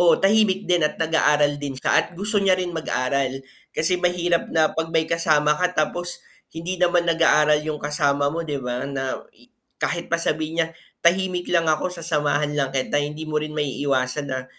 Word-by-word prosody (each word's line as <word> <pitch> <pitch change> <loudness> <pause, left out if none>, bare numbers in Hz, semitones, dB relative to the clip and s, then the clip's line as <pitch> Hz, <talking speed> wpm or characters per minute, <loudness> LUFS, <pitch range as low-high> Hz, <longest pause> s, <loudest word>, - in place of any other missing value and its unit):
oo 170 -2 +4
tahimik 200 -1 +2
din 175 -3 +2
at - - -6
nag-aaral 150 -2 +2
din 145 -1 -5
siya 130 - -2
at - - -6
gusto 205 +4 +4
niya 195 -1 +2
rin 180 -1 -2
mag-aral 135 -4 -2 0.3
kasi 170 +3 +2
mahirap 175 -1 0
na 160 -1 +3
pag 165 +1 -5
may 160 0 +1
kasama 150 -3 +3
ka 180 +2 0
tapos 175 +2 0 0.3
hindi 170 +3 -5
naman 175 -1 +1
nag-aaral 150 -2 +3
yung 155 -1 -4
kasama 145 -1 +1
mo 165 +2 -4
'di 145 -3 -4
ba? 125 0 -4
Na 135 -1 -4 0.6
kahit 170 0 -2
pa 170 - +3
sabihin 160 +1 0
niya 160 - -3 0.3
tahimik 180 +1 +1
lang 170 -1 +2
ako, 155 +3 0
sasamahan 150 -3 0
lang 135 -2 0
kita, 135 +2 -1
hindi 150 +2 -5
mo 155 0 0
rin 155 0 -6
maiiwasan 140 -1 -1
na 130 -1 -4
155 Hz, 180 wpm, -22 LUFS, 145-175 Hz, 0.6 s, oo